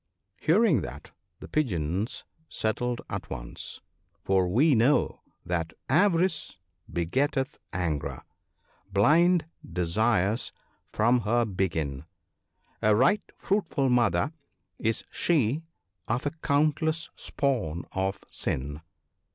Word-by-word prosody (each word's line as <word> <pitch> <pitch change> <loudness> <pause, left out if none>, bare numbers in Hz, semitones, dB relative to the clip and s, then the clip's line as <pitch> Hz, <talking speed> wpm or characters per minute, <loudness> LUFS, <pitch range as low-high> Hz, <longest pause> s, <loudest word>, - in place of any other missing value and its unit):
" - - -50
Hearing 175 - +5
that, 70 0 -8 0.3
the - - -8
Pigeons 95 - -1 0.3
settled 120 +2 -1
at - - -5
once; - - -7 0.4
for 95 -1 +2
we 135 - +4
know 125 +5 +3 0.2
that 80 -2 -2 0.2
"Avarice 165 - +2 0.3
begetteth 135 - 0
anger; 75 -7 -2 0.7
blind 160 - +4 0.2
desires 95 +4 +1 0.4
from 120 +3 +3
her 120 +2 +2
begin; 80 -8 -2 0.8
A 105 0 +4
right 135 - +4
fruitful 165 -9 0
mother 120 - +2 0.5
is 110 0 0
she 150 -3 +1 0.5
of 120 +4 -1
a 145 - +1
countless 160 +1 +1
spawn 110 - -1
of 95 +1 -1
sin." 75 +3 -3
115 Hz, 100 wpm, -28 LUFS, 90-150 Hz, 0.8 s, Hearing